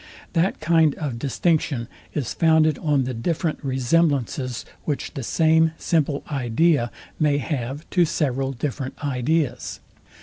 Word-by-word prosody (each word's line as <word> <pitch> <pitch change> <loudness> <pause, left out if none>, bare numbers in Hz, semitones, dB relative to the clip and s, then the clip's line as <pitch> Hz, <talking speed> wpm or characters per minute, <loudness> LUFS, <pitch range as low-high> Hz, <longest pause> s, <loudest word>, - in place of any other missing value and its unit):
That 175 +3 +1
kind 160 -2 +3
of 135 -7 -4
distinction 140 -3 0 0.3
is 145 -5 -2
founded 160 -2 +3
on 145 -4 +2
the 130 +1 -3
different 155 +7 -2
resemblances, 130 -2 0 0.2
which 145 -3 -3
the 135 - -4
same 160 +4 +3
simple 150 -4 0
idea 135 0 +2 0.3
may 150 -2 +3
have 140 0 -3
to 180 -2 +4
several 135 -4 0
different 135 0 -4
ideas. 135 -1 -1
145 Hz, 125 wpm, -23 LUFS, 130-160 Hz, 0.3 s, to